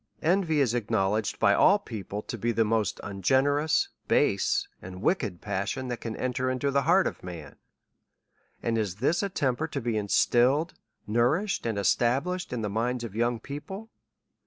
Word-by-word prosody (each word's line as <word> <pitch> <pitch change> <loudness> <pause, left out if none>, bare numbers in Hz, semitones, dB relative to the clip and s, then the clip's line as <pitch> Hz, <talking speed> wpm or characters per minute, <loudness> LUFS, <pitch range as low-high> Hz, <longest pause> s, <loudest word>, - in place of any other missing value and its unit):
Envy 165 -2 +2
is 125 -4 +2
acknowledged 110 -2 0
by 100 - +4
all 200 - +5
people, 105 - -6
to - - -5
be 120 +1 -1
the 115 0 +2
most 110 -1 0
ungenerous, 135 - +1 0.2
base, - - +2
and 90 0 -9
wicked 110 - 0
passion, 105 +6 -3
that 120 -2 -4
can 115 -2 -4
enter 130 0 -1
into 130 +2 0
the 140 0 +2
heart 180 +6 +4
of - - -3
a - - -12
man., 80 -5 -8 1.1
And 115 -1 0
is 100 -5 -2
this 135 - +1
a 200 - -1
temper 140 -3 -1
to 150 - -4
be 115 -3 -1
instilled, 125 - +2 0.3
nourished, 125 - +1
and 110 -3 -1
established 135 - +1
in 120 -3 -3
the - - 0
minds 120 +4 -1
of 115 -4 -6
young 120 +1 0
people 190 - -8
120 Hz, 170 wpm, -27 LUFS, 105-145 Hz, 1.1 s, all